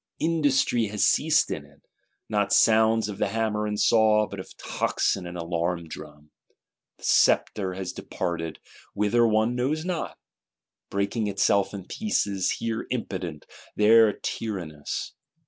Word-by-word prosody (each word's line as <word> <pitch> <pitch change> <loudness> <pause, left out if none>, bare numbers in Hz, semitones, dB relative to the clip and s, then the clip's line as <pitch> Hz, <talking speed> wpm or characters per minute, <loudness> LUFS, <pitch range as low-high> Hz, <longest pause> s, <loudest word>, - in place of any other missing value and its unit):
Industry 145 -8 +1
has 105 0 +1
ceased - - +3
in - - -4
it; - - -22 0.4
not 105 -2 0
sounds 110 +1 +4
of 105 -2 -7
the - - +1
hammer 105 0 -1
and 105 0 -3
saw, 110 -2 +4
but 100 - -8
of 95 - -7
the - - -16
tocsin 90 -2 -1
and 90 0 -7
alarm 85 0 -2
drum. 75 -1 -11 0.7
The - - -22
sceptre 95 -3 +2
has 95 -1 -5
departed, 80 -2 -4 0.4
whither 105 +3 +3
one 110 +2 +2
knows 145 +6 -1
not;—breaking 110 - -5
itself 100 0 +2
in 100 -3 -7
pieces: 100 - -1
here 115 -1 -3
impotent, 90 -10 -4 0.3
there 110 +1 +6
tyrannous. 90 -11 -5
105 Hz, 130 wpm, -26 LUFS, 95-115 Hz, 0.7 s, there